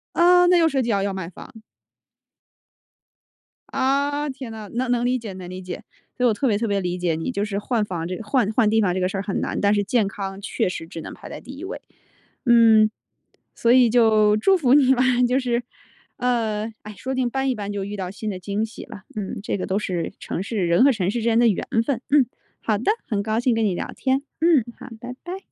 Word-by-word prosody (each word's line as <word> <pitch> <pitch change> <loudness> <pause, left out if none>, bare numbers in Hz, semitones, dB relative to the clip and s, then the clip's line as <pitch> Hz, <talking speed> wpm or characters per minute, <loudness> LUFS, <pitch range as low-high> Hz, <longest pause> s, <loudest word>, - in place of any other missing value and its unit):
呃， 355 +1 +6
那 360 - +5
又 330 -1 +5
涉 275 -3 0
及 240 - -2
要 200 -3 +2
要 200 -1 -1
卖 190 -3 -5
房。 180 - -13 2.2
啊， 280 +2 0
天 260 -4 -7
啊， 215 -1 -8
能 250 +1 -1
能 240 -1 +1
理 250 +1 +2
解 220 -5 -7
能 180 -1 -8
理 185 +1 -7
解。 180 -1 -7 0.3
所 250 - +1
以 - - +6
我 225 - +3
特 270 +5 0
别 210 - +2
特 230 +2 -1
别 200 -1 +1
理 180 -1 -2
解 175 -2 0
你， 160 +10 -3
就 205 -4 -1
是 200 -1 -3
换 225 0 0
房 170 -4 -4
这 185 - -3
个 225 - -7
换 230 -2 +1
换 220 -1 +3
地 220 +1 +3
方 185 -4 +2
这 185 - -1
个 185 - +1
事 195 - -4
儿 195 - -1
很 195 - -2
难， - - -2
但 205 0 +3
是 205 -1 +2
健 215 0 +1
康 195 0 -6
确 - - -1
实 165 -2 -6
只 165 - -7
能 - - -8
排 - - -11
在 - - -7
第 265 - -11
一 300 - -8
位。 390 +6 -5 0.7
嗯， 225 -2 +6 0.7
所 235 - +2
以 250 -2 +6
就 215 -3 +4
祝 380 - +4
福 265 -6 +3
你 265 -2 +5
吧， 250 - +2 0.2
就 250 +2 +2
是， 245 -2 0 0.6
呃 225 -3 -1
哎， 210 - -8
说 260 - -5
不 - - -1
定 255 -2 0
搬 265 +2 -1
一 - - +2
搬 205 -1 -5
就 200 -1 -3
遇 205 +1 -5
到 185 -2 -4
新 215 +2 -5
的 185 - -6
惊 200 +4 -2
喜 225 - -10
了。 205 - -11
嗯， 205 -3 -4
这 210 - -2
个 - - -4
都 190 - 0
是 180 -5 -3
城 - - -4
市 200 -2 -1
人 170 +8 +4
和 280 - +6
城 195 -5 -1
市 240 - -2
之 220 - -4
间 230 -1 +2
的 240 - +5
缘 205 - 0 0.2
分。 255 -4 -1
嗯， 285 -2 +5 0.4
好 215 -2 0
的， 245 - +2 0.2
很 210 -5 -1
高 220 +2 -1
兴 245 0 +2
跟 225 0 +1
你 190 -4 0
聊 - - -4
天。 265 +1 0 0.2
嗯， 325 -6 +5 0.2
好， 255 - -9
拜 245 +2 -7
拜。 360 +2 -5
220 Hz, 270 characters per minute, -23 LUFS, 200-255 Hz, 2.2 s, 呃